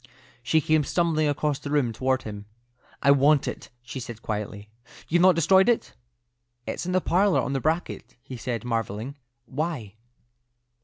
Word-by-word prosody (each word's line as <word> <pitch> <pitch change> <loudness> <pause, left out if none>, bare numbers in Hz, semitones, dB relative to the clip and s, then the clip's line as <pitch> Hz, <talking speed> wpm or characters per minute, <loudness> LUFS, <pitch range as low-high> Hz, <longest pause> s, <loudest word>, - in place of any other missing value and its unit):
She 155 +6 +2
came 155 +1 +2
stumbling 160 0 +1
across 145 0 0
the 145 - -7
room 140 -6 +1
toward 130 +3 0
him. 105 -1 -8 0.6
"I 140 - +6
want 140 +1 +4
it," - - -6
she 130 +2 -7
said, 120 -2 -8
quietly. 105 -1 -4 0.4
"You've 175 +2 +2
not 185 -1 +6
destroyed 190 +6 +5
it?" 235 - 0 0.7
"It's - - -4
in - - -1
the 185 0 +2
parlour, 190 +3 +3
on 135 - -1
the 135 - -1
bracket," 160 +5 -2
he - - -10
replied, 120 -1 -4
marvelling. 115 +1 -3 0.3
"Why?" 140 - -4
140 Hz, 160 wpm, -25 LUFS, 120-160 Hz, 0.7 s, I